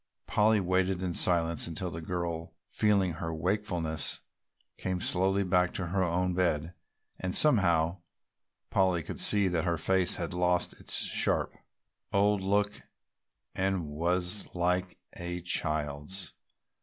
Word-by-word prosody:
Polly 105 Hz, +1 st, +3 dB
waited 95 Hz, 0 st, 0 dB
in 90 Hz, -2 st, -2 dB
silence 85 Hz, -2 st, +2 dB
until 85 Hz, +2 st, -4 dB
the 80 Hz, +1 st, -6 dB
girl, 85 Hz, -1 st, -4 dB
feeling 100 Hz, -4 st, +1 dB
her 80 Hz, +1 st, -4 dB
wakefulness, 85 Hz, -2 st, -1 dB, 0.6 s
came 95 Hz, -1 st, -2 dB
slowly 95 Hz, +3 st, +1 dB
back 90 Hz, -1 st, +1 dB
to 90 Hz, -, -2 dB
her 95 Hz, +2 st, 0 dB
own 90 Hz, +1 st, 0 dB
bed 85 Hz, -2 st, 0 dB, 0.5 s
and 95 Hz, 0 st, -2 dB
somehow 85 Hz, -, +3 dB, 0.7 s
Polly 95 Hz, -3 st, +2 dB
could -, -, -7 dB
see 100 Hz, -2 st, +3 dB
that 85 Hz, -3 st, 0 dB
her 85 Hz, -2 st, 0 dB
face 95 Hz, +2 st, +2 dB
had 85 Hz, -2 st, -4 dB
lost 90 Hz, 0 st, +1 dB
its -, -, -5 dB
sharp, -, -, +1 dB, 0.6 s
old 100 Hz, 0 st, +3 dB
look 100 Hz, +2 st, 0 dB, 0.7 s
and 95 Hz, -2 st, 0 dB
was 90 Hz, +6 st, -1 dB
like 90 Hz, +1 st, 0 dB, 0.2 s
a 90 Hz, 0 st, -4 dB
child's. 75 Hz, +1 st, -1 dB
90 Hz, 130 wpm, -30 LUFS, 85-95 Hz, 0.7 s, Polly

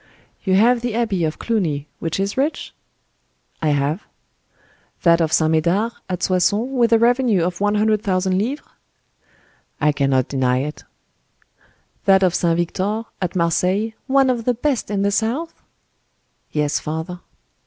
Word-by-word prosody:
"You 190 Hz, -2 st, +2 dB
have 235 Hz, +4 st, +4 dB
the 240 Hz, -2 st, -2 dB
abbey 220 Hz, -7 st, 0 dB
of 155 Hz, 0 st, -3 dB
Cluny, 160 Hz, -11 st, -1 dB
which 165 Hz, +2 st, -3 dB
is 195 Hz, +1 st, -1 dB
rich?" 285 Hz, +4 st, -2 dB, 0.9 s
"I 160 Hz, -, 0 dB
have." 145 Hz, +5 st, 0 dB, 1.0 s
"That 170 Hz, -1 st, +5 dB
of 160 Hz, -1 st, +1 dB
St. 160 Hz, 0 st, +3 dB
Medard 175 Hz, +8 st, +1 dB, 0.2 s
at 180 Hz, -2 st, -3 dB
Soissons, 190 Hz, +7 st, +1 dB
with 240 Hz, -3 st, +2 dB
a 230 Hz, -, +6 dB
revenue 235 Hz, -5 st, +3 dB
of 175 Hz, +2 st, -3 dB
one 205 Hz, 0 st, +2 dB
hundred 215 Hz, 0 st, +2 dB
thousand 185 Hz, -1 st, 0 dB
livres?" 260 Hz, +8 st, -3 dB, 1.1 s
"I 150 Hz, -1 st, +3 dB
cannot 135 Hz, -3 st, +1 dB
deny 130 Hz, -2 st, +1 dB
it." 150 Hz, +1 st, -6 dB, 1.2 s
"That 195 Hz, -1 st, +5 dB
of 180 Hz, -2 st, +3 dB
St. 170 Hz, -1 st, +1 dB
Victor, 195 Hz, +6 st, -1 dB, 0.2 s
at 180 Hz, +1 st, -2 dB
Marseilles,—one 215 Hz, -, +1 dB
of 235 Hz, -2 st, -3 dB
the 250 Hz, -, +1 dB
best 265 Hz, +1 st, -1 dB
in 200 Hz, -1 st, -1 dB
the 200 Hz, -, +2 dB
south?" 240 Hz, +11 st, -1 dB, 1.0 s
"Yes 150 Hz, -1 st, 0 dB
father." 160 Hz, +3 st, -5 dB
190 Hz, 145 wpm, -20 LUFS, 165-230 Hz, 1.2 s, a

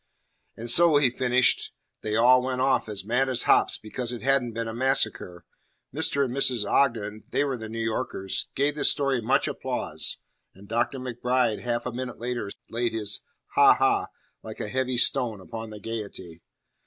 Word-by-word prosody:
"And 115 Hz, -, -6 dB
so," 165 Hz, +5 st, +6 dB
he 135 Hz, -4 st, +3 dB
finished, 125 Hz, 0 st, +2 dB, 0.3 s
"they 105 Hz, 0 st, -2 dB
all 125 Hz, +3 st, +5 dB
went 130 Hz, 0 st, -3 dB
off 130 Hz, -3 st, +1 dB
as 100 Hz, -2 st, -4 dB
mad 125 Hz, +4 st, +1 dB
as 125 Hz, -, +2 dB
hops -, -, +3 dB
because 120 Hz, +3 st, -5 dB
it 120 Hz, -, -7 dB
hadn't 135 Hz, -3 st, +1 dB
been 115 Hz, 0 st, -3 dB
a 110 Hz, -, -5 dB
massacre." 110 Hz, -8 st, 0 dB, 0.5 s
Mr. 145 Hz, -1 st, +1 dB
and 125 Hz, -, -5 dB
Mrs. 125 Hz, -5 st, +2 dB
Ogden 110 Hz, -4 st, 0 dB
they -, -, +1 dB
were 140 Hz, -2 st, -1 dB
the 110 Hz, -2 st, -8 dB
New 115 Hz, -, -7 dB
Yorkers 110 Hz, -4 st, -2 dB
gave 140 Hz, +2 st, +1 dB
this 145 Hz, -1 st, +3 dB
story 140 Hz, -3 st, +1 dB
much 110 Hz, -, +1 dB
applause, -, -, -3 dB, 0.4 s
and 100 Hz, +2 st, -15 dB
Dr. 120 Hz, +5 st, -1 dB
MacBride 125 Hz, -2 st, -1 dB
half 120 Hz, -1 st, -3 dB
a 125 Hz, -, -3 dB
minute 125 Hz, +1 st, -6 dB
later 120 Hz, -3 st, -4 dB, 0.2 s
laid 120 Hz, 0 st, -2 dB
his 105 Hz, -2 st, -1 dB, 0.3 s
"ha -, -, +6 dB
ha," -, -, +1 dB, 0.3 s
like 110 Hz, -1 st, -9 dB
a 105 Hz, -, -4 dB
heavy 130 Hz, +1 st, -1 dB
stone, 120 Hz, -3 st, +3 dB
upon 110 Hz, +3 st, -8 dB
the 105 Hz, -1 st, -9 dB
gaiety. 100 Hz, -6 st, -7 dB
120 Hz, 180 wpm, -26 LUFS, 110-130 Hz, 0.5 s, so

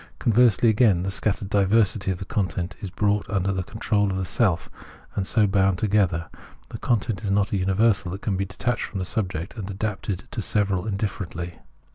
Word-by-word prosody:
Conversely, 120 Hz, -1 st, +4 dB
again, 110 Hz, -5 st, +4 dB
the 95 Hz, -, -2 dB
scattered 100 Hz, 0 st, -1 dB
diversity 100 Hz, 0 st, +2 dB
of 95 Hz, -, -1 dB
the 95 Hz, -, -7 dB
content 95 Hz, -6 st, -2 dB
is 100 Hz, -, -4 dB
brought 105 Hz, +2 st, 0 dB
under 100 Hz, -1 st, 0 dB
the 95 Hz, -, -1 dB
control 105 Hz, +1 st, 0 dB
of 95 Hz, -, -2 dB
the 95 Hz, -, -1 dB
self, 90 Hz, -3 st, +1 dB, 0.5 s
and 95 Hz, -1 st, -1 dB
so 110 Hz, -2 st, +4 dB
bound 95 Hz, -2 st, +2 dB
together; 95 Hz, -5 st, +1 dB, 0.4 s
the -, -, -7 dB
content 110 Hz, -3 st, 0 dB
is 100 Hz, -, -2 dB
not 100 Hz, +1 st, +1 dB
a 100 Hz, -, +1 dB
universal 95 Hz, +1 st, +2 dB
that 95 Hz, +3 st, -6 dB
can 100 Hz, -, 0 dB
be 95 Hz, +1 st, -1 dB
detached 120 Hz, +6 st, -2 dB
from 100 Hz, -, -7 dB
the 95 Hz, -, -2 dB
subject, 90 Hz, -3 st, -2 dB
and 100 Hz, -2 st, -5 dB
adapted 100 Hz, -1 st, -3 dB
to -, -, -3 dB
several 100 Hz, -2 st, 0 dB
indifferently. 95 Hz, -4 st, -4 dB
100 Hz, 190 wpm, -24 LUFS, 95-105 Hz, 0.5 s, Conversely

